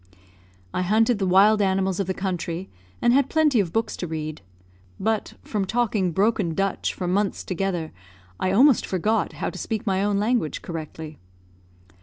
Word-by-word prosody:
I - - 0
hunted 220 +4 +2
the 190 - 0
wild 205 +4 +5
animals 190 -1 +1
of 195 - -1
the 190 - -2
country, 180 -1 -3 0.3
and 240 0 +5
had 275 0 +3
plenty 305 -6 +3
of 180 -5 0
books 225 +2 -1
to 175 - -4
read; 155 -3 -5 0.6
but, 220 0 -1
from 210 -3 -2
talking 210 -3 0
broken 195 -2 +1
Dutch 195 +2 0
for 180 - -3
months 195 +2 0
together, 180 -3 -2 0.5
I 185 - 0
almost 255 +6 +5
forgot 210 +5 0
how - - -3
to - - -8
speak 225 +1 -3
my 195 -1 +1
own 205 -1 +1
language 215 -5 0
correctly. 160 -2 -7
195 Hz, 165 wpm, -24 LUFS, 180-220 Hz, 0.6 s, wild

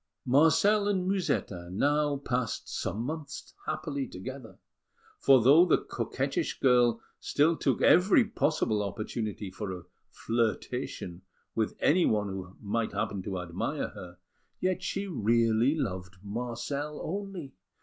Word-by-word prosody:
Marcel 165 +10 +4
and 190 -3 0
Musetta 145 - -1
now 145 +7 +1
passed 125 -4 -2
some 105 +5 -3
months 150 +1 -6
happily 140 -3 -2
together, 125 +5 -8 0.6
for 135 -4 +6
though 145 +7 +8
the 180 - +4
coquettish - - -3
girl 120 -3 +4 0.2
still 160 +3 +2
took 135 -6 0
every 195 +7 +6
possible 150 - 0
opportunity 105 -1 -4
for 100 +1 -5
a 90 -2 -7 0.3
flirtation 110 -5 -2 0.3
with 110 -2 -1
anyone 110 - +3
who 95 -1 -7
might 110 +2 -1
happen 100 -2 -2
to 95 0 -4
admire 85 -1 -3
her, 90 0 -11 0.4
yet 185 0 0
she 195 +1 -2
really 115 - +2
loved 95 - -3
Marcel 125 +7 -4
only. 195 -5 -5
125 Hz, 120 wpm, -29 LUFS, 105-155 Hz, 0.6 s, though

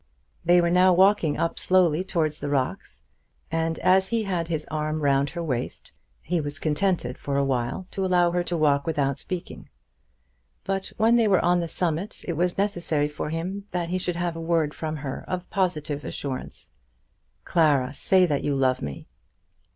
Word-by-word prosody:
They 175 +1 +5
were 170 0 +1
now 180 +1 +5
walking 190 -4 +4
up 165 - -1
slowly 180 -3 +3
towards 160 -5 -1
the 145 - -3
rocks. 135 -3 -2 0.5
And 165 0 0
as 190 +1 +3
he 230 +2 0
had 180 -5 -2
his 160 -3 -2
arm 155 0 -2
round 140 -1 +2
her 170 +3 -5
waist, 130 -6 -4 0.3
he 170 +2 0
was 145 -1 -3
contented 155 -4 -1
for 140 -1 -2
awhile 135 +4 -1
to 195 - -2
allow 180 -2 +3
her 175 0 +1
to 175 - -1
walk 145 -2 +2
without 140 -4 0
speaking. 180 -2 -6 0.9
But 195 0 -2
when 225 +2 +4
they 230 -2 +3
were 190 -3 +3
on 175 0 +3
the 170 - -2
summit 175 +4 -2
it 170 - -1
was 175 +2 0
necessary 175 -7 0
for 150 - -5
him 185 +5 -4
that 175 -1 -2
he 185 +1 -1
should 180 -1 -2
have 175 -1 -2
a 165 - -5
word 165 -3 +1
from 155 -1 -4
her 140 -3 -5
of 180 -1 -4
positive 155 -7 -1
assurance. 135 -3 -5 0.7
"Clara, 145 -6 +2
say 185 +5 +4
that 145 -5 -1
you 145 - 0
love 130 -1 +1
me." 70 -1 -6
165 Hz, 180 wpm, -25 LUFS, 145-180 Hz, 0.9 s, They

